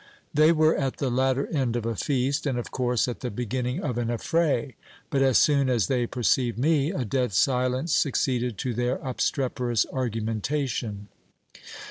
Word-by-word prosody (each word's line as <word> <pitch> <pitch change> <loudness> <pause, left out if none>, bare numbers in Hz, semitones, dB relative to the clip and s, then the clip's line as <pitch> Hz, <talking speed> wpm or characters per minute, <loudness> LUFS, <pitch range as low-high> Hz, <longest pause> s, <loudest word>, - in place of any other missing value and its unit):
They 155 +2 +5
were 155 -1 +3
at 135 -2 -2
the 135 -3 -1
latter 130 +2 +1
end 130 -7 -1
of 120 -2 -2
a 115 -1 -1
feast, 140 +3 0
and 130 -3 -1
of 120 - -5
course 125 -2 0
at 120 - -4
the 125 - -4
beginning 125 +3 -3
of 125 -5 -2
an 120 - -1
affray; 135 +1 0 0.4
but 135 - +1
as 135 -2 +4
soon 140 -3 +3
as 120 -6 +2
they 120 +2 0
perceived 120 -1 0
me, 145 +2 +2
a 135 -10 -2
dead 125 0 -1
silence 130 - +1
succeeded 125 -5 0
to 125 +3 -2
their 120 +2 0
obstreperous 125 -3 0
argumentation. 115 -2 -2
125 Hz, 165 wpm, -26 LUFS, 120-135 Hz, 0.4 s, They